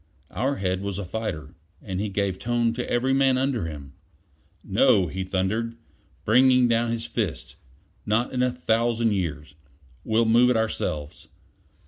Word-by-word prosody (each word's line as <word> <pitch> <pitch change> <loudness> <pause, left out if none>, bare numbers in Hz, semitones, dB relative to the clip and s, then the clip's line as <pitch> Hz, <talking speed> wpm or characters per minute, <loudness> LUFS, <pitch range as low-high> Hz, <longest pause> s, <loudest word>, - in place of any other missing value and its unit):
Our 135 +5 -1
head 95 -3 -2
was 100 -1 -4
a 100 - -4
fighter, 90 -7 -5 0.3
and 95 -3 -5
he 105 +1 -2
gave 100 -1 -2
tone 120 -1 0
to 120 +1 -4
every 130 +2 +1
man 135 -1 +3
under 130 -8 -1
him. 70 -3 -9 0.7
"No," 100 -1 +3
he 95 +3 -4
thundered, 105 +5 -2 0.5
bringing 125 +2 +5
down 115 0 +1
his 115 0 -3
fist. 110 -8 -4 0.5
"Not 115 +5 0
in 125 - 0
a 125 - +3
thousand 115 -1 +1
years. 80 -6 -3 0.5
We'll 110 +1 +2
move 120 +2 +5
it 125 - +2
ourselves. 75 -9 -3
110 Hz, 150 wpm, -25 LUFS, 95-120 Hz, 0.7 s, bringing